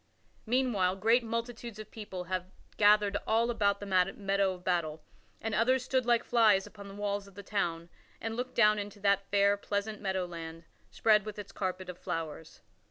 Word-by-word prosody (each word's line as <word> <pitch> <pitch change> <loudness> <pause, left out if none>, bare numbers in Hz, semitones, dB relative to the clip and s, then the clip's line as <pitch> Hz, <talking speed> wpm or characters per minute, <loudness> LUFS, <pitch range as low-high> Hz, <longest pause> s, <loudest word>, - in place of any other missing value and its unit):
Meanwhile, 220 -7 +2
great 230 +5 +3
multitudes 230 0 -4
of 215 - -9
people 205 -5 -6
had 185 +1 -3 0.3
gathered 205 -1 +4
all 230 +2 +2
about 200 -3 +1
the 205 - -6 0.3
meadow 195 -1 +1
of 180 - -15
battle, 165 -4 -1 0.4
and 225 -1 -3
others 255 +4 +3
stood 255 -2 0
like 235 -1 +4
flies 215 -5 +4
upon 200 -2 -11
the 195 - -10
walls 205 -1 -2
of 195 - -17
the 200 - -9
town 170 -5 -2 0.3
and 225 0 -4
looked 250 +2 -4
down 210 -2 +5
into 205 0 -6
that 200 -1 +2
fair, 200 0 +4
pleasant 205 +1 -3
meadow 190 -2 -1
land, 165 -1 -8 0.3
spread 210 -2 +3
with 215 0 -7
its 200 -1 -8
carpet 185 -1 -3
of 180 -1 -8
flowers. 160 -1 -5
205 Hz, 180 wpm, -31 LUFS, 190-225 Hz, 0.4 s, down